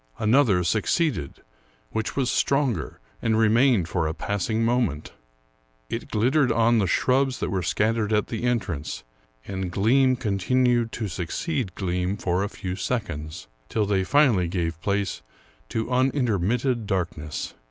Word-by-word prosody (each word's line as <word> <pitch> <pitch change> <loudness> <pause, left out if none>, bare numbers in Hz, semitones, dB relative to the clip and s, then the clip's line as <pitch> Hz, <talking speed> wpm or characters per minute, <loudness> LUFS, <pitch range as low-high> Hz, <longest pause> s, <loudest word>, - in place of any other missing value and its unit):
Another 110 -5 +3
succeeded, 110 - 0 0.5
which 110 - -3
was 130 -3 +1
stronger, 135 - 0 0.2
and 110 -1 +1
remained 115 -3 +4
for 85 -2 -1
a 80 - -3
passing 105 +5 -1
moment. 115 - 0 0.8
It - - -4
glittered 130 +4 +2
on 115 0 +3
the 100 - +1
shrubs 130 +7 +1
that - - -2
were 95 -2 0
scattered 110 +4 0
at 105 -1 +2
the 115 - -5
entrance, 110 -11 -2 0.4
and 95 -2 -4
gleam 130 +7 +3
continued 120 +2 +1
to 110 - -3
succeed 95 - -3
gleam 90 +1 -1
for 90 -1 0
a 100 - -2
few 95 -4 -5
seconds, 90 -8 -4 0.2
till 110 -2 0
they 100 -2 +1
finally 120 - +3
gave 85 -2 -3
place 100 -1 -1 0.5
to 110 +2 -3
unintermitted 125 -2 +1
darkness. 85 -6 -3
110 Hz, 135 wpm, -25 LUFS, 90-125 Hz, 0.8 s, remained